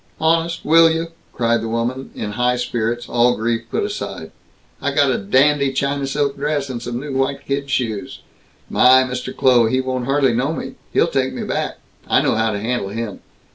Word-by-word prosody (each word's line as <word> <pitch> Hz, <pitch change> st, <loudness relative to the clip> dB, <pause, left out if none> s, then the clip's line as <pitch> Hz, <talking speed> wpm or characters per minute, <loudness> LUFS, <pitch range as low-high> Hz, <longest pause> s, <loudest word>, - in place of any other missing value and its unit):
"Honest, 165 Hz, +1 st, +1 dB
will 165 Hz, +1 st, +6 dB
you?" 165 Hz, +1 st, -2 dB, 0.2 s
cried 115 Hz, -1 st, +1 dB
the 115 Hz, -, -4 dB
woman, 120 Hz, +4 st, -2 dB
in 105 Hz, -, -4 dB
high 125 Hz, +3 st, +1 dB
spirits, 120 Hz, -1 st, -2 dB
all 120 Hz, 0 st, +3 dB
grief 115 Hz, +1 st, -1 dB
put -, -, -1 dB
aside. -, -, -5 dB, 0.5 s
"I -, -, -1 dB
got -, -, +4 dB
a -, -, 0 dB
dandy 140 Hz, +7 st, +3 dB
China 140 Hz, +1 st, -1 dB
silk 140 Hz, 0 st, -1 dB
dress, 145 Hz, -1 st, -1 dB
and 120 Hz, -2 st, -5 dB
some 120 Hz, 0 st, -4 dB
new 140 Hz, +1 st, -6 dB
white 135 Hz, +1 st, -1 dB
kid 140 Hz, 0 st, -2 dB
shoes! 110 Hz, -6 st, -2 dB, 0.5 s
My, 130 Hz, +1 st, +5 dB
Mr. 125 Hz, 0 st, -4 dB
Kloh, 125 Hz, -4 st, +4 dB
he 130 Hz, +3 st, +1 dB
won't 130 Hz, -1 st, -2 dB
hardly 135 Hz, -2 st, +2 dB
know 135 Hz, +7 st, 0 dB
me. -, -, -6 dB, 0.2 s
He'll -, -, +3 dB
take 135 Hz, -5 st, -1 dB
me -, -, -4 dB
back. -, -, -3 dB, 0.3 s
I -, -, +4 dB
know -, -, +2 dB
how 110 Hz, 0 st, +1 dB
to 105 Hz, -1 st, -2 dB
handle 115 Hz, -2 st, -2 dB
him. 110 Hz, -1 st, -5 dB
130 Hz, 195 wpm, -20 LUFS, 115-140 Hz, 0.5 s, will